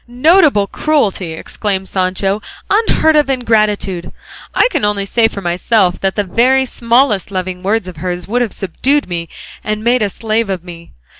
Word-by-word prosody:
"Notable 275 - +4
cruelty!" 200 - -1
exclaimed 190 +3 -4
Sancho; 190 +2 -1 0.3
"unheard 405 -7 +3
of 295 -2 +3
ingratitude! 215 -8 0 0.4
I - - +4
can - - -1
only 205 -1 0
say 225 +3 +2
for 200 - -6
myself 180 +2 +1
that 195 0 -1
the 205 - 0
very 255 +7 +2
smallest 235 -5 +1
loving 185 -1 -4
word 200 +1 0
of 180 -3 -9
hers 175 +1 -4
would 245 +4 0
have 235 -4 -1
subdued 270 - 0
me 170 -2 -4 0.3
and 215 0 -3
made 240 +1 +2
a 210 - +1
slave 220 +1 -2
of 185 -3 -3
me. 170 -2 -12
205 Hz, 165 wpm, -15 LUFS, 185-240 Hz, 0.4 s, Notable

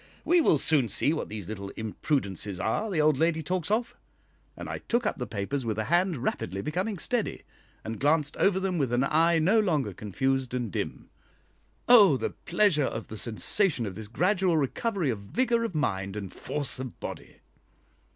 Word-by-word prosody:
We 350 0 +4
will 165 - +4
soon 140 -5 +3
see 145 - +2
what 160 - -4
these 105 -4 -6
little 100 -2 -6
imprudences 105 - -2
are 210 - -1
the 180 -6 -1
old 150 -2 +3
lady 160 -1 +1
talks 180 +2 -2
of." 230 +3 0 0.6
And - - -7
I - - -4
took 235 0 -1
up - - -1
the 125 - -3
papers 110 +6 -3
with 110 -2 -2
a 110 - 0
hand 175 - +1
rapidly 100 -6 -3
becoming 185 +7 -2
steady, 235 +5 -2 0.4
and 110 0 -5
glanced 145 0 +2
over 195 -1 +3
them 185 -3 -1
with 135 -4 0
an 125 +2 +2
eye 165 +4 +3
no 190 +8 +3
longer 150 - 0
confused 130 +6 -2
and 120 -5 -3
dim. - - -5 0.8
Oh 205 - +7
the - - -3
pleasure 200 -8 +1
of 110 -2 -5
the 110 - -7
sensation 125 - +2
of 100 - -5
this 105 +2 -8
gradual 180 - +1
recovery 170 - -1
of 110 - -4
vigour 235 - 0
of 225 -7 -4
mind 95 -9 -1
and 100 -3 -6
force 145 -3 -4
of 130 -3 -7
body! - - -8
150 Hz, 185 wpm, -27 LUFS, 110-185 Hz, 0.8 s, Oh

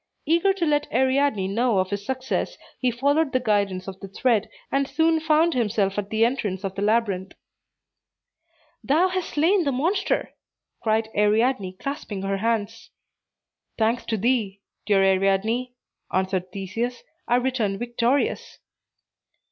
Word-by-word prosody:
Eager 340 +5 +3
to 380 -3 -1
let 295 -1 0
Ariadne 260 -5 +2
know 230 +1 +1
of 185 +1 0
his 200 0 -3
success, 260 +3 -2 0.2
he 255 - +2
followed 280 +5 +1
the 255 - +3
guidance 200 -6 0
of 190 0 -7
the 195 - -8
thread, 215 +2 +1 0.2
and 275 0 +1
soon 320 +1 +2
found 315 +1 +3
himself 210 -5 0
at 200 -1 -5
the 220 +1 +3
entrance 210 -6 -2
of 195 -1 -3
the 195 - -5
labyrinth. 205 -3 0 1.5
"Thou 330 +7 +3
hast 370 -1 -2
slain 345 +5 +3
the 280 - 0
monster," 345 +10 0 0.5
cried 220 0 +1
Ariadne, 210 -1 +2
clasping 215 -3 -5
her 195 0 -1
hands. 225 +1 -2 0.9
"Thanks 225 +2 +1
to 220 - -1
thee, 210 -3 0 0.3
dear 200 -2 +4
Ariadne," 195 +6 +1 0.4
answered 185 -1 -1
Theseus, 215 +6 -4 0.2
"I 240 - +3
return 245 -6 0
victorious." 240 +4 -1
230 Hz, 140 wpm, -24 LUFS, 200-270 Hz, 1.5 s, dear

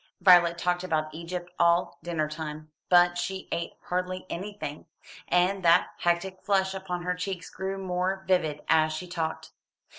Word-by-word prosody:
Violet 175 -2 +6
talked 180 +1 0
about 155 -3 -1
Egypt 175 +2 -6
all 170 +1 +3
dinner 165 -2 -1
time, 155 0 -7 0.2
but 175 0 +5
she 190 +2 -4
ate 170 - -2
hardly 185 +1 -3
anything, 190 -5 -6 0.4
and 185 +2 +2
that 170 +1 +5
hectic 175 +2 0
flush 190 -2 +1
upon 185 -2 -4
her 180 0 0
cheeks 180 0 -5
grew 190 +1 -4
more 190 0 -2
vivid 160 -6 +1
as 155 -1 +4
she 155 +4 -5
talked. 165 -2 -4
180 Hz, 150 wpm, -27 LUFS, 170-185 Hz, 0.4 s, Violet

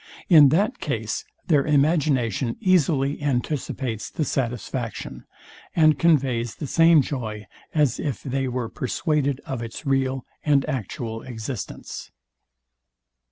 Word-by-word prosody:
In 150 -6 +8
that 200 - +1
case 440 - -3 0.2
their 150 -6 +3
imagination 140 - +1
easily 150 -7 +2
anticipates 130 -4 -2
the 155 - -2
satisfaction, 120 -2 -3 0.5
and 155 -3 +4
conveys 130 -8 +2
the 150 - -5
same 165 +1 +5
joy, 110 -7 -5 0.3
as 145 -6 +2
if 140 -7 -3
they 135 0 -1
were 125 -2 -2
persuaded 140 +1 -1
of 130 -3 -4
its 115 +6 -7
real 135 -1 0 0.2
and 145 -2 +3
actual 115 -1 -4
existence. 120 -1 -6
135 Hz, 115 wpm, -24 LUFS, 120-150 Hz, 0.5 s, In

